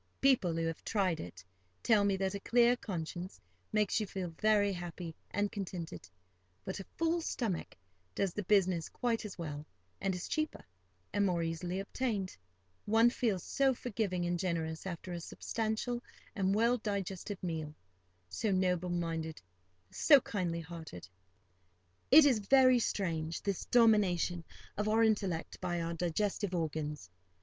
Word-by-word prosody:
People 250 -11 +3
who 165 0 0
have 165 0 -4
tried 190 -6 +1
it, 90 +2 -9 0.4
tell 215 -3 +4
me 200 -1 +2
that 190 0 -1
a 200 - -3
clear 240 +3 +4
conscience 180 -4 -5 0.3
makes 210 -1 +2
you 215 - -2 0.3
very 210 -2 +4
happy 175 -2 -6
and 205 0 -1
contented; 180 - -6 0.6
but 190 - -4
a 195 - -7
full 330 +1 +1
stomach 220 - -3 0.4
does 195 -3 0
the 210 - -2
business 185 -4 +2
quite 230 -3 -1
as 200 - -7
well, 150 -4 -5 0.4
and 195 -1 0
is 180 - -5
cheaper, 310 -1 -2 0.5
and 205 - +2
more 175 -3 +1
easily 175 +3 -2
obtained. 200 -2 -2 0.5
One 225 +3 +5
feels 215 -9 0
so 270 -2 +2
forgiving 200 -7 -2
and 175 0 -1
generous 165 -2 -2
after 180 0 -5
a 175 - -3
substantial 225 +6 -3 0.3
and 195 -1 +1
well 235 +3 +3
digested 200 -1 -3
meal—so 90 - -6
noble 180 -1 +1
minded, 165 -2 -2 0.5
so 285 -3 +6
kindly 175 -8 -2
hearted. 160 - -9 1.0
It 300 +2 +9
is 255 -6 +4
very 255 +3 +5
strange, 165 -7 -2
this 200 -2 -2
domination 195 -7 +3 0.3
of 210 +1 0
our 225 +1 +4
intellect 195 -7 0
by 175 0 -1
our 165 0 -2
digestive 185 +3 -1
organs. 150 - -3
190 Hz, 140 wpm, -33 LUFS, 170-215 Hz, 1.0 s, It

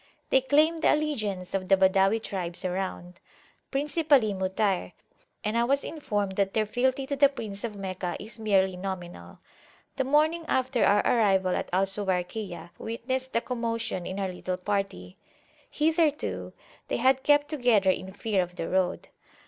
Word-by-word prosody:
They 265 - +5
claim 305 +5 +3
the - - +4
allegiance 215 -12 -3
of 190 -1 -2
the 195 - +5
Badawi 195 +3 +3
tribes 180 -2 -4
around, 180 -1 -4 0.5
principally 285 -5 +2
Mutayr, 190 - -1 0.5
and 215 +2 -1
I 235 - +3
was 275 +3 +1
informed 205 -11 -3
that 195 -1 0
their 215 -1 +2
fealty 260 +5 0
to 280 +1 -2
the 280 0 +5
Prince 210 -7 -7
of 225 -3 -4
Meccah 185 -2 -4
is 220 +1 -8
merely 190 -3 +2
nominal. 180 - -7 0.6
The 265 - +2
morning 305 +5 +2
after 260 -3 +1
our 205 +1 +5
arrival 195 -5 +3
at - - -3
Al 190 +2 +3
Suwayrkiyah 190 -1 -3
witnessed 260 +3 -4
a 230 - +3
commotion 230 -6 -3
in 190 +1 -4
our 195 -1 -1
little 180 0 -4
party: 195 -1 -3 0.5
hitherto 315 -1 0 0.3
they - - -1
had 260 +2 +3
kept 290 +1 +3
together 245 -10 +3
in 190 +1 -5
fear 205 0 0
of 180 0 -5
the 165 - -4
road. 185 0 0
210 Hz, 155 wpm, -27 LUFS, 190-260 Hz, 0.6 s, They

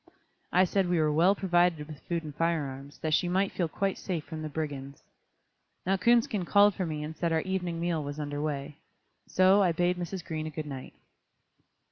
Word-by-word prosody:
I 185 - +5
said 190 0 +1
we 175 - +2
were 155 -1 +3
well 170 +6 +4
provided 175 -5 +2
with 150 -2 -10
food 170 -1 -3
and 150 -2 -7
fire 165 0 0
arms, 135 +1 -9
that 155 -1 0
she 175 - +3
might 190 +2 +1
feel 175 - -1
quite 195 +4 -2
safe 170 -5 -3
from 160 -1 -7
the 155 - -4
brigands. 140 -3 -5 0.8
Now 190 +2 +2
Coonskin 225 -1 +3
called 205 +3 +5
for 185 -3 -2
me 150 -1 -3
and 155 +1 -6
said 170 +1 -1
our 160 0 +2
evening 180 -2 -2
meal 170 -2 -1
was 145 +1 -6
under 145 -1 -3
way. 145 -1 -3 0.5
So, 190 +2 +5
I 180 -3 +4
bade 175 +2 +1
Mrs. 175 0 -5
Green 155 -1 -3
a - - -3
good 155 0 -5
night. 135 -3 -8
165 Hz, 205 wpm, -29 LUFS, 150-185 Hz, 0.8 s, I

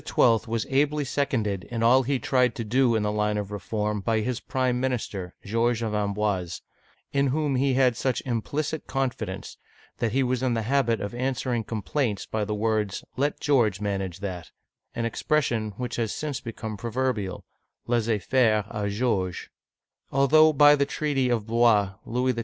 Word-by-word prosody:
was 115 -1 +3
ably 145 +2 +2
seconded 115 -9 -1
in 115 -1 -3
all 125 +3 +6
he 135 +2 0
tried 125 -2 +1
to 115 - -3
do 120 +2 +2
in 110 - +1
the 105 - 0
line 105 0 0
of 105 -1 -4
reform 105 +1 -2
by 110 +2 +1
his 120 +2 -2
prime 130 -2 -1
minister 110 -8 -3
(George 115 +2 +1
of 110 -1 -2
Amboise), 100 -4 -1 0.5
in 140 0 +2
whom 145 0 0
he 135 0 +2
had 130 -2 +3
such 130 +2 0
implicit 140 +6 -2
confidence, 120 -8 -3 0.4
that 115 - 0
he 135 +4 +2
was 125 0 0
in 125 -2 +1
the 115 - -1
habit 120 -1 +1
of 100 +3 -4
answering 125 -1 -1
complaints 110 0 -2
by 110 -1 -2
the 105 +1 -2
words, 105 -2 -1
"Let 145 +2 0
George 115 -9 +2
manage 95 -3 -3
that, 90 -4 -5 0.2
— - - -41
an 115 0 -1
expression 115 -3 0
which 125 -1 -4
has 115 -3 -1
since 150 -4 -4
become 110 -2 -6
proverbial 115 -3 -2 0.4
{Laissez 115 -2 +1
faire 110 0 +2
d 105 -1 -2
Georges), 100 -4 -1 0.6
Although 155 +4 +5
by 145 0 +7
the 140 -1 +1
treaty 140 -4 0
of 115 -4 0
Blois 110 -4 +3
Louis 125 +2 +1
XII. 115 - -4
115 Hz, 170 wpm, -26 LUFS, 105-130 Hz, 0.6 s, by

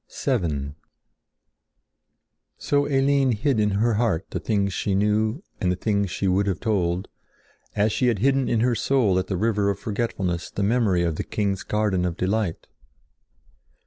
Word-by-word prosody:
VII 75 - -1 1.8
So 145 0 +1
Eline 135 -2 +2
hid 120 +2 0
in 105 -1 +2
her 110 +4 +1
heart 105 -6 0
the - - -2
things 100 -3 0
she 95 +1 -1
knew 110 - +1 0.2
and 90 - +1
the - - 0
things 100 0 0
she 95 - -2
would 95 +2 +2
have 95 -4 -1
told, 95 -4 0 0.7
as 105 +1 +2
she 125 - +1
had 120 -3 +2
hidden 135 +4 +2
in 115 -2 +1
her 125 +1 +2
soul 115 -6 +2
at 95 - -3
the 95 - -2
river 105 0 +1
of 100 - -1
forgetfulness 100 -5 -3
the 100 - -3
memory 100 -5 +2
of 85 -2 -1
the - - -2
king's 100 -2 -2
garden 105 -4 0
of 90 -1 -2
delight. 95 -2 -1
105 Hz, 165 wpm, -24 LUFS, 95-115 Hz, 1.8 s, Eline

